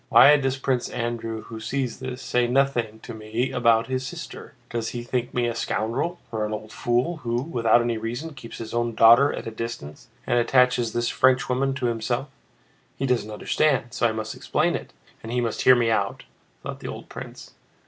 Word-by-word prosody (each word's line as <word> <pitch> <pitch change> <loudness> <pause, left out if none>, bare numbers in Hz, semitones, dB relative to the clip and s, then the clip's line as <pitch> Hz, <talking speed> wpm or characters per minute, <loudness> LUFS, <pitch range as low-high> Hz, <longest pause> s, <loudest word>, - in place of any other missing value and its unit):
"Why 145 +2 +8
does 135 -2 0
Prince 130 -2 -1
Andrew, 115 -2 -3
who 110 - -8
sees 130 +2 -3
this, 130 0 -6
say 125 -1 +1
nothing 120 -4 +1
to 120 - -8
me 110 +4 -2
about 115 -3 +3
his 130 0 -2
sister? 135 - -8 0.2
Does 115 -1 -2
he 120 -1 -5
think 125 0 -2
me 120 -1 0
a 120 - 0
scoundrel, 115 +9 -2
or 110 -2 -1
an 105 0 -2
old 110 0 -6
fool 125 +8 0
who, 120 -3 -2
without 120 -6 +3
any 120 -2 -1
reason, 120 +8 -4
keeps 120 -4 -10
his 110 -1 -7
own 120 -1 -1
daughter 120 +5 +7
at - - -6
a 115 - -4
distance 110 - -7 0.2
and 120 - +2
attaches 125 -1 +3
this 120 0 0
Frenchwoman 130 +1 +2
to 130 -2 -2
himself? 120 +3 -1 0.7
He 135 - -1
doesn't 125 -5 0
understand, 120 +3 0
so 120 - +2
I - - -1
must 110 0 -4
explain - - 0
it, - - -6 0.3
and 115 - -7
he 125 - 0
must 115 -2 -1
hear 130 - +7
me 120 -2 +2
out," 100 -3 -1 0.4
thought - - -6
the - - -7
old - - -7
prince. - - -9
120 Hz, 200 wpm, -25 LUFS, 115-130 Hz, 0.7 s, Why